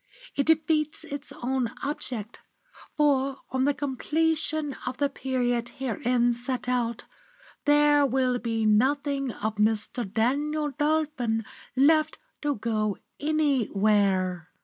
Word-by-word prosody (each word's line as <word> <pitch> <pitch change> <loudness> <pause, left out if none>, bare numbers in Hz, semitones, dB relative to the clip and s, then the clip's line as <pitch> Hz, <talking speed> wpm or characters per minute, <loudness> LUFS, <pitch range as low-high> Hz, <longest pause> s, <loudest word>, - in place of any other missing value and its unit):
It 280 - 0
defeats 310 -1 +2
its 285 -3 -7
own 250 -2 0
object, 245 -6 -3 0.6
for 275 -2 +2
on 260 +1 +1
the 290 - +3
completion 310 +2 -1
of 255 0 -3
the 285 +1 +1
period 245 -3 -1
herein 245 -1 +1
set 250 +1 -2
out, 240 -2 -1 0.6
there 295 0 +5
will 255 -1 +1
be 225 -2 -1
nothing 275 +5 +2
of 215 0 -4
Mr. 215 0 0
Daniel 290 +7 0
Dolphin 295 -6 0 0.3
left 310 +3 +4 0.2
to 290 -1 0
go 215 -2 -1 0.2
anywhere! 205 - +1
260 Hz, 110 wpm, -27 LUFS, 230-295 Hz, 0.6 s, there